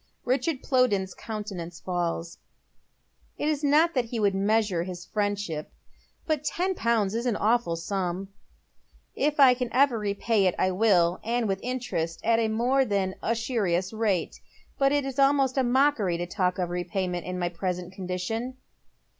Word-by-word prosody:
Richard 270 +3 0
Plowden's 205 -9 +2
countenance 195 -6 -6
falls. 170 -2 -3 1.0
It 295 - -1
is 300 -1 0
not 310 +4 +4
thst 255 -3 +1
he 230 0 -4
would 200 -2 +2
measure 200 -2 +1
his 175 0 -6
fiiendship, 205 -7 -2 0.6
but 305 -3 -1
ten 370 +5 0
pounds 225 - +1
is 235 +2 -1
an 235 - +1
awful 220 -5 +1
sura. 180 +2 -3 0.5
" - - -36
If 295 +1 0
I 270 -2 +9
ever - - +2 0.3
can 235 -3 -3
repay 205 0 +1
it 180 - +1
I 185 - +2
will, 180 -4 +3
and 235 0 0
with 195 -1 -1
interest 240 -10 -3
at 230 +1 +3
a 225 - +2
more 245 +5 +2
than 200 -5 0
•usurious 220 -5 -1
rate. 210 -6 -1 0.4
But 275 0 +4
it 290 -1 +1
is 270 0 -4
almost 275 -1 +3
a 265 - +2
mockery 245 -8 +2
to 175 - -3
talk 180 0 -1
of 180 -2 -2
repayment 180 0 -2
in 180 0 -3
my 175 -1 -1
present 180 +1 -4
condition." 190 +7 -4
210 Hz, 165 wpm, -27 LUFS, 180-250 Hz, 1.0 s, I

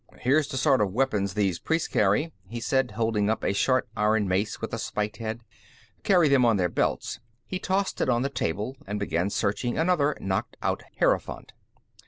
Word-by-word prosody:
"Here's 140 +4 +2
the 130 - -4
sort 135 -2 +3
of 100 -2 +1
weapons 105 -6 0
these 95 -5 +1
priests 160 0 0
carry," 110 +11 +1
he 120 +4 -6
said, 130 +2 +1
holding 110 -3 +1
up 110 - -1
a - - +1
short 130 +5 +2
iron 105 -1 +2
mace 95 +3 -1
with - - -5
a - - -2
spiked 105 0 -3
head. 115 0 -4 0.6
"Carry 180 -5 +4
them 140 -3 +4
on 115 -3 +4
their 90 -2 +1
belts." - - -1 0.3
He 185 - -4
tossed 190 +1 -1
it - - +1
on 120 0 +2
the 140 - 0
table, 105 0 -2
and 105 +1 -3
began 90 -1 0
searching 105 +4 -1
another 160 -4 +2
knocked 95 -1 -2
out - - 0 0.2
hierophant. - - 0
115 Hz, 190 wpm, -26 LUFS, 100-135 Hz, 0.6 s, Carry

